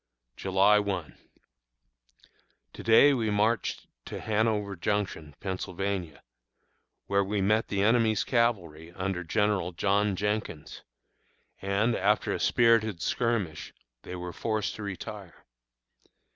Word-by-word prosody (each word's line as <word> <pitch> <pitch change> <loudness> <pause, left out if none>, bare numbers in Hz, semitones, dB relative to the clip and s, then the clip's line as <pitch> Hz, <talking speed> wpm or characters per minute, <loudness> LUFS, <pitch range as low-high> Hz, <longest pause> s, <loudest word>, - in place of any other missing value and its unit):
July 100 +2 +3
1. 95 -6 -3 1.6
To - - -9
day 115 +6 +6
we 115 -5 0
marched 105 +2 0 0.2
to - - -6
Hanover 105 -2 0
Junction, 85 -6 -2
Pennsylvania, 95 -5 -4 0.8
where 100 0 +2
we 100 +1 -2
met 105 +3 +2
the 100 -1 0
enemy's 110 -1 +3
cavalry 90 - 0
under 95 -1 -3
General 100 0 0
John 100 +3 +1
Jenkins, 100 -7 -3 0.8
and, 100 +5 +1
after 105 +3 +1
a - - -3
spirited 115 -5 +3
skirmish, 105 -5 -2 0.3
they 90 - -8
were 90 -1 -6
forced 110 -3 -2
to - - -8
retire. 100 -1 -8
100 Hz, 110 wpm, -28 LUFS, 90-110 Hz, 1.6 s, day